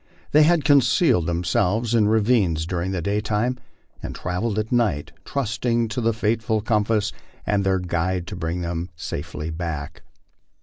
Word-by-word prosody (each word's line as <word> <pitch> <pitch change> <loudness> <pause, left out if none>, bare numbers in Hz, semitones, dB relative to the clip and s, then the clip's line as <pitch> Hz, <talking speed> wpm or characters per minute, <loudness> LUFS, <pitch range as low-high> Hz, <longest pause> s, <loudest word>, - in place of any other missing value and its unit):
They 150 - +6
had 155 -1 +4
concealed 135 - +4
themselves 90 +6 0
in 110 -3 +4
ravines 105 -7 +2
during 90 +1 -2
the 95 -3 -2
daytime 105 +5 0 0.4
and - - -6
travelled 100 +5 -2
at 110 0 -2
night, 110 -12 +1
trusting 115 -2 -1
to 125 +2 -2
the 115 0 +2
faithful 110 0 0
compass 105 -1 +1 0.3
and 100 -1 +1
their 95 0 +2
guide 90 0 -1
to 95 - -7
bring 85 +1 -3
them 85 +1 -3
safely 80 -1 -5
back. 80 -3 -5
105 Hz, 145 wpm, -23 LUFS, 85-115 Hz, 0.4 s, They